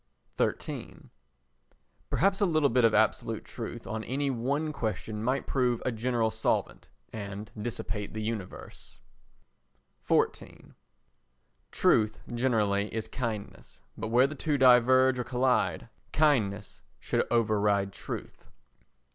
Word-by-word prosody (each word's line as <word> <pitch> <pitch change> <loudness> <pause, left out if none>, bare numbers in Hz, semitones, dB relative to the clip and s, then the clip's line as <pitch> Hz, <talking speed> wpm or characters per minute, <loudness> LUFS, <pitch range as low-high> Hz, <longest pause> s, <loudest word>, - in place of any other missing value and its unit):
xiii - - -9 1.0
Perhaps 195 +2 +2
a - - +5
little 155 -4 +3
bit 125 +1 +2
of 115 -1 +4
absolute - - +1
truth - - -7
on 110 0 -4
any 140 +2 -1
one 140 +6 -1
question 110 -3 -3
might 130 +3 0
prove 125 -3 +1
a 130 - +1
general 115 -1 0
solvent, - - -1 0.3
and 100 -1 -6
dissipate 105 -2 -4
the 110 0 -5
universe. 105 - -6 1.1
xiv - - -1 1.0
Truth 110 0 +2
generally 105 -5 +1
is 110 -1 -3
kindness, 105 - -6 0.2
but 110 - -4
where 120 +4 +4
the 140 - -3
two 150 0 -1
diverge 130 0 +5
or - - 0
collide, 125 -9 0 0.2
kindness 110 -10 +1 0.2
should - - 0
override 105 -4 +2
truth. - - -7
115 Hz, 115 wpm, -29 LUFS, 105-130 Hz, 1.1 s, a